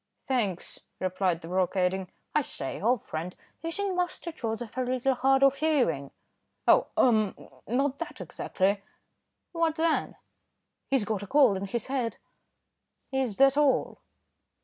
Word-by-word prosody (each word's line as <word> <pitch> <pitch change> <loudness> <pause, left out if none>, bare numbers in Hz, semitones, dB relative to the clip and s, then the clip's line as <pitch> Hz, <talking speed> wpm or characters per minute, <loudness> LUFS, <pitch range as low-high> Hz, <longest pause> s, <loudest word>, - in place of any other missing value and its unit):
"Thanks," 210 -9 -1 0.2
replied 185 -2 0
the 165 - -9
broker, 185 +2 0
adding, 185 0 0 0.2
"I 300 - +4
say, 135 - -5
old 235 +1 +2
friend 165 +3 -5 0.3
isn't 370 +4 -2
Master 355 -1 -2
Joseph 230 -5 -4
a 260 - 0
little 255 +1 +1
hard 270 +2 +3
of 275 0 +5
hearing?" 245 - +1 0.6
"Oh! - - +6
ah! 215 -5 +4 0.3
not 270 +4 0
that 335 - -6
exactly." 195 +1 -1 0.7
"What 330 -2 +1
then?" 325 0 +1 0.7
"He's 270 -6 +2
got 210 -3 -2
a 200 - -7
cold 265 -7 +5
in 195 - -4
his 235 +3 -2
head." 255 -4 -2 0.9
"Is 265 -6 -1
that 275 +1 +5
all?" 290 -3 +2
245 Hz, 140 wpm, -28 LUFS, 190-275 Hz, 0.9 s, Oh